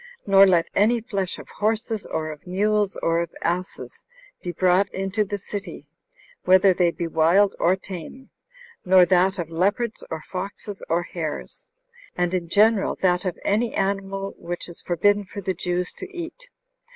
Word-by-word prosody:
Nor 195 0 +7
let 175 -3 +3
any 230 +4 +3
flesh 200 -5 -3
of - - -11
horses, 220 0 -2
or 155 -1 -3
of 150 +3 -12
mules, 205 +2 +1
or 165 0 +2
of 170 - -3
asses, 180 +2 -3 0.4
he 175 - -4
brought 185 +3 +2
into 195 +3 -1
the 205 0 -4
city, 200 +1 -7 0.6
whether 185 +1 +5
they 175 -1 +3
be 170 0 -4
wild 165 +5 +3
or 180 +2 +3
tame; 190 +7 -9 0.5
nor 185 -1 +6
that 190 +2 +3
of 165 -2 -4
leopards, 205 +7 0
or 160 -1 -5
foxes, 195 +2 -6
or 170 +1 +1
hares; 165 -3 -6 0.5
and, 175 0 0
in 175 -2 -2
general, 210 +2 +3
that 180 0 +2
of 180 - -2
any 225 +3 +1
animal 195 0 -2
which 175 +1 -5
is 175 - -9
forbidden 205 +4 +2
for 200 +1 -9
the 190 -1 -2
Jews 180 +1 -2
to 385 - -6
eat. 380 +8 -8
190 Hz, 165 wpm, -24 LUFS, 175-205 Hz, 0.6 s, Nor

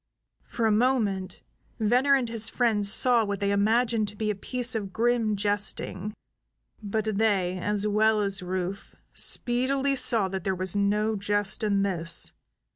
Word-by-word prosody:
For 230 - -2
a 220 - +3
moment 210 -5 0 0.4
Venner 250 +6 +3
and 260 -3 0
his 225 -1 -2
friends 210 -5 +1
saw 240 +1 +3
what 200 -2 -3
they 200 0 0
imagined 220 +2 +1
to 205 - -5
be 215 0 -1
a - - -4
piece 250 +4 -1
of 205 -4 -4
grim 230 +1 +1
jesting; 205 0 -2 0.7
but 215 0 -2
they, 190 -4 +1
as 205 +2 -1
well 215 +1 +2
as 200 -1 -1
Rufe, 185 +2 -5 0.2
speedily 270 +3 +1
saw 235 -6 +3
there 190 0 -3
was 185 +1 -3
no 210 +2 +1
jest 205 +1 -2
in 200 -2 +1
this. 170 -4 +1
210 Hz, 150 wpm, -26 LUFS, 200-230 Hz, 0.7 s, a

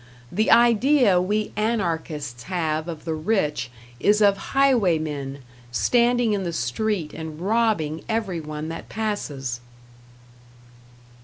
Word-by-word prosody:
The 215 +5 +1
idea 235 -3 +5
we 210 +3 -1
Anarchists 165 - -2
have 160 -3 -1
of 160 -3 -7
the 165 - -1
rich 155 - -1 0.3
is 210 +9 +3
of 200 -2 +5 0.2
highwaymen, 155 - +1 0.3
standing 240 - +2
in 200 -2 -1
the 170 -2 -3
street 160 - -2
and 160 -1 -7
robbing 195 -6 0
every 215 -6 -1
one 150 0 -6
that 165 - -7
passes. 145 - -3
180 Hz, 110 wpm, -24 LUFS, 155-220 Hz, 0.3 s, idea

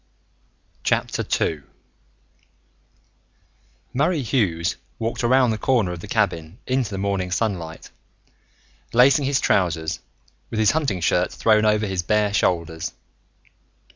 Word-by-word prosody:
II 80 -3 0 2.3
Murray 150 +3 +1
Hughes 100 -9 0 0.2
walked 115 +2 -3
around 125 0 +4
the 110 - -3
corner 115 -9 +1
of 90 - -6
the - - -9
cabin 80 +3 -1
into 130 -3 0
the 100 - -5
morning 95 -2 -1
sunlight, 90 -5 -3 1.0
lacing 135 +4 +5
his 140 0 +2
trousers, 80 -3 0 0.5
with 110 - -3
his 110 - +4
hunting 135 - -1
shirt 90 +1 +1
thrown 110 -1 +3
over 105 0 +3
his 95 -3 -1
bare 105 +2 +1
shoulders. 85 -5 0
105 Hz, 110 wpm, -22 LUFS, 90-120 Hz, 2.3 s, lacing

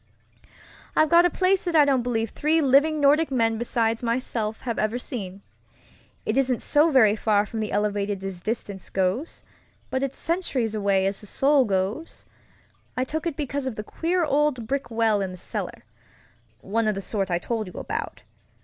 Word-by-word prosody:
"I've 310 +1 +3
got 340 +1 +7
a - - +4
place 370 +2 +1
that 345 -2 -2
I 300 -2 +7
don't 270 -3 +2
believe 230 -2 -1
three 315 +2 +1
living 295 +2 +3
Nordic 295 +2 +4
men 225 -4 +1
besides 230 -1 0
myself 230 -2 -2
have 235 -3 -3
ever 215 +3 0
seen. 200 -6 -5 0.8
It 215 - 0
isn't 255 -3 0
so 300 +3 +4
very 225 -8 +5
far 210 -1 +2
from 220 +2 -6
the 215 -1 -3
elevated 205 -1 -1
as 190 -2 -5
distance 205 -3 -4
goes, 190 - -2 0.5
but 260 - -1
it's 275 -1 -3
centuries 285 - -1
away 200 -2 +1
as 195 +1 -1
the 210 - -6
soul 275 +4 +3
goes. 200 - -3 0.7
I 255 - +2
took 315 +5 -3
it 320 - -4
because 280 -2 -3
of 250 - -3
the 210 - -5
queer 345 +9 -1
old 290 -5 +1
brick 270 +1 -2
well 225 -3 +1
in 190 - -2
the 185 - -9
cellarŌĆöone 185 - -6
of 210 - -1
the 195 - -4
sort 195 -3 -2
I 175 - +1
told 220 +3 -3
you 180 - -10
about. - - -5
230 Hz, 180 wpm, -25 LUFS, 205-285 Hz, 0.8 s, got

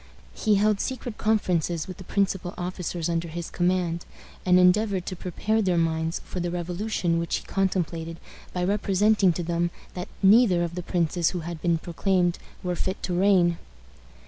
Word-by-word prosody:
He 215 -2 +2
held 205 0 +2
secret 245 -4 -4
conferences 175 -6 +1
with 185 -1 -7
the - - -9
principal 190 -2 -1
officers 175 -2 -3
under 170 0 -1
his 170 +1 -6
command, 175 -1 0 0.4
and 180 0 +6
endeavored 185 +1 +3
to 185 - -4
prepare 210 +5 -1
their 185 -4 +1
minds 165 0 0
for 185 - -5
the 175 0 -1
revolution 175 0 -1
which 170 - -1
he - - -4
contemplated 170 -4 -1 0.3
by 180 - -2
representing 200 0 +3
to 175 - -3
them 170 +1 0 0.2
that 180 +2 -6
neither 195 -3 +6
of 170 0 -3
the 180 - -4
princes 175 -1 +1
who 180 - -4
had 165 -1 -6
been 170 -1 +2
proclaimed 175 +1 0 0.2
were 180 -1 -1
fit 185 +2 -3
to 180 - -1
reign. 180 -2 +3
180 Hz, 170 wpm, -26 LUFS, 170-195 Hz, 0.4 s, and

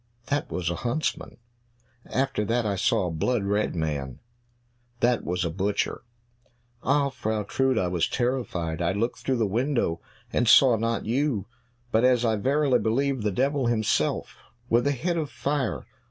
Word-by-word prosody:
"That 145 +2 -1
was 85 -2 -1
a 85 - -3
huntsman." 125 - -2 0.7
"After 135 -4 0
that 115 +2 0
I 100 -2 0
saw 95 0 +1
a 90 - -2
blood 105 +8 0
red 105 0 0
man." 75 -5 -3 0.8
"That 120 0 +2
was 90 +1 -1
a 85 - -1
butcher." 100 +4 -1 0.8
"Ah, 140 +1 +2
Frau 110 -4 -2
Trude, 130 +4 +1
I 95 - +1
was 90 -2 0
terrified; 95 -10 -2
I 85 +2 +1
looked 115 +5 -1
through 130 -1 -1
the 115 - +2
window 115 - 0 0.3
and 120 - +1
saw 125 +1 +7
not 115 +1 -1
you, 120 -3 0 0.5
but, 110 +1 +3
as 125 -1 +4
I 110 -1 +2
verily 135 +3 +2
believe, 130 +4 0
the 105 - +1
devil 135 +4 +1
himself 110 -3 0 0.3
with 120 +4 +3
a - - +3
head 170 +6 -1
of 155 -3 -2
fire." 130 - -2
115 Hz, 165 wpm, -26 LUFS, 100-135 Hz, 0.8 s, saw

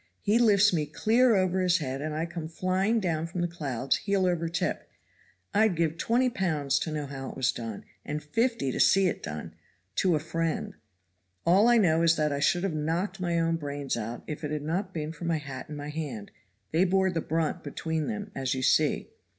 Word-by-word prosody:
He 215 +3 +3
lifts 205 -4 +5
me 155 -3 0
clear 230 +9 +3
over 185 -1 +2
his 180 -1 +3
head 135 -4 -4
and 155 0 -3
I 160 +2 -1
come 170 -2 -6
flying 185 +6 +1
down 165 -5 -1
from 175 +1 -4
the 175 - +1
clouds 135 -6 -1
heel 200 -2 0
over 170 -2 0
tip. 180 +2 -2 0.6
I'd 215 -3 +3
give 165 -1 0
twenty 245 +3 +2
pounds 150 - 0
to 160 - -3
know 150 -1 -3
how 135 -1 -6
it - - -9
was 130 -2 +2
done, 115 -3 -6 0.2
and 150 +1 -4
fifty 225 - 0
to - - -4
see 195 0 +5
it 180 - -1
done 75 0 -6 0.4
to 180 -4 +3
a - - +1
friend, 165 +1 -2 0.7
All 190 +6 +5
I 240 0 +6
know 165 -6 +4
is 165 0 +4
that 150 -2 +1
I 140 - -1
should 175 +5 +2
have 195 -4 0
knocked 170 +6 -2
my 170 -2 0
own 165 0 +1
brains 145 -2 -3
out 115 +1 -5
if 150 0 -6
it 150 - -2
had 150 -1 -3
not 180 +5 -2
been 155 -3 -4
for 165 +2 -8
my 165 -1 +1
hat 140 -3 -7
and 150 - -6
my 145 0 -6
hand 145 -9 -5 0.4
they 165 +3 +3
bore 190 0 +2
the 165 -2 -1
brunt 165 +2 -1
between 160 -2 -3
them, 210 -2 -4
as 135 -1 -1
you 130 - -3
see." - - +2
165 Hz, 215 wpm, -28 LUFS, 150-185 Hz, 0.7 s, I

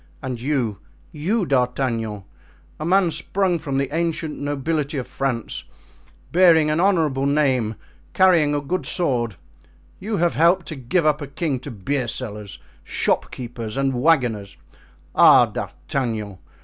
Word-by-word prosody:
And 125 -3 -4
you, 125 -7 -1 0.3
you, 185 +8 -1
D'Artagnan, 125 - -1 0.6
a 155 - -3
man 185 0 +3
sprung 185 0 -1
from 140 -3 -3
the 140 +2 -1
ancient 165 -2 -1
nobility 145 +1 -2
of 130 - -3
France, 115 - -3 0.7
bearing 165 -3 +5
an 155 - +1
honorable 160 -8 +2
name, 130 -6 +1 0.4
carrying 165 -6 +4
a 145 - 0
good 145 +1 -3
sword, 120 - 0 0.7
have 190 -5 0
helped 170 +3 +3
to 160 - -5
give 135 +6 0
up 150 0 +2
a 145 - -5
king 140 -2 -2
to 145 - -8
beersellers, 115 -3 -4 0.3
shopkeepers, 120 -2 -3
and 135 -1 +1
wagoners. 125 -8 +1 0.6
Ah! - - +7
D'Artagnan! 110 -8 -4
140 Hz, 125 wpm, -22 LUFS, 120-165 Hz, 0.7 s, Ah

